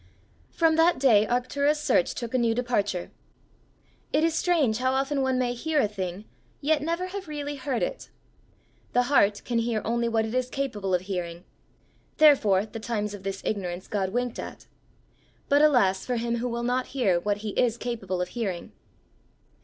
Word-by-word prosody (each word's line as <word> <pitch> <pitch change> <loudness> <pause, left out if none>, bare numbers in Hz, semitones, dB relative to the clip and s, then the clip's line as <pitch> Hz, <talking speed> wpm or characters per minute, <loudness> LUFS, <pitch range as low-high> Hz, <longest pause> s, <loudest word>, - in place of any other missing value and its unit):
From 325 -1 +2
that 330 +1 +4
day 225 -6 +4
Arctura's 280 +5 +1
search 255 - +1
took 235 -1 -5
a 255 - +2
new 230 -1 +2
departure. 205 -7 -1 1.0
It 305 - +2
is 330 0 +2
strange 310 -10 +2
how 260 +1 +1
often 275 +1 0
one 260 -1 +1
may 245 -1 0
hear 310 +5 0
a 245 - +3
thing, 195 -1 -5 0.3
yet 300 +1 +1
never 335 +4 -2
have 390 -1 -6
really 290 -1 -4
heard 260 -2 -2
it! - - -4 0.8
The 245 - +4
heart 205 -5 +4
can 235 -2 0
hear 230 -1 0
only 235 +1 0
what 225 -1 +1
it 220 - -5
is 255 0 0
capable 210 -10 -1
of 180 - 0
hearing; 180 -2 -5 0.7
therefore 220 - +5
"the 220 +1 -8
times 210 -2 -3
of 205 - -8
this 195 0 -5
ignorance 185 -3 -3
God 195 -3 -1
winked 245 +3 -2
at;" - - -8 0.8
but 285 +1 +5
alas 240 -11 +4
for 250 - -2
him 235 0 -1
who 245 +1 -2
will 235 0 -3
not 250 +1 0
hear 190 -9 +3
what 205 +3 -1
he - - -1
is 235 +2 +1
capable 195 -7 -3
of 180 - -7
hearing! 200 -8 -4
240 Hz, 180 wpm, -26 LUFS, 205-275 Hz, 1.0 s, therefore